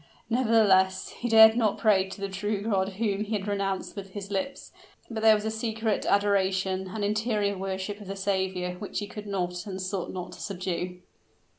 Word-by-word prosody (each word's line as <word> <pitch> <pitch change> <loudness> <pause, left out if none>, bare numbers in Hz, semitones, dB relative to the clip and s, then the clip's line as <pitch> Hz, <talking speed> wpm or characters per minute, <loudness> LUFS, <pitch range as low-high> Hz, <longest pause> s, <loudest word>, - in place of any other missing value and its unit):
Nevertheless, 205 -6 +3
he 240 - -5
dared 220 0 +8
not 220 -4 +2
pray 195 -3 +3
to 195 - -9
the 200 - -2
True 200 +1 -2
God 195 -3 0
whom 205 0 -1
he 215 +1 -5
had 205 -1 -2
renounced 195 -1 -2
with 195 -2 -8
his 200 -1 -6
lips; 275 +9 -3 0.4
but 220 -1 -3
there 220 -1 +7
was 210 0 -3
a 220 - 0
secret 220 -1 -1
adoration, 190 -2 +1
an 205 +3 -4
interior 210 -1 0
worship 195 +2 -4
of 205 - -10
the 195 - -4
Saviour, 190 -2 -1
which 205 - -5
he 205 - -1
could 210 0 -8
not 180 -1 -3
and 190 -1 -5
sought 185 0 -3
not 180 -1 -6
to 180 - -11
subdue. 180 -2 -3
200 Hz, 190 wpm, -27 LUFS, 190-215 Hz, 0.4 s, dared